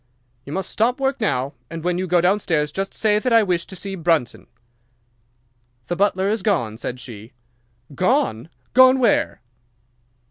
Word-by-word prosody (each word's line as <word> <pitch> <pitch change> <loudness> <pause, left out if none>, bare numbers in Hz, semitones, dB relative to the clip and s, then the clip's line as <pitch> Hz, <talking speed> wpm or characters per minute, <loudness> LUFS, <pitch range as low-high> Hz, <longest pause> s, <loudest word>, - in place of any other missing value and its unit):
"You - - -7
must 190 +1 -3
stop 245 +4 +1
work 270 -2 -1
now, 135 -9 -1 0.2
and 165 -1 -7
when 180 0 0
you 185 - -2
go 175 0 +3
downstairs 175 -5 +1
just 195 +4 -3
say 210 -1 +1
that 250 +3 -1
I 230 -1 +6
wish 180 -4 -1
to 190 - -9
see 195 +2 -5
Brunton." 165 -8 -1 1.4
"'"The 175 - -3
butler 195 0 +1
is 215 +2 0
gone," 120 - -1
said 125 0 -5
she. 115 -1 -11 0.6
"'"Gone! 175 - 0 0.2
Gone 260 +1 +7
where?" 240 - +1
185 Hz, 155 wpm, -21 LUFS, 150-215 Hz, 1.4 s, Gone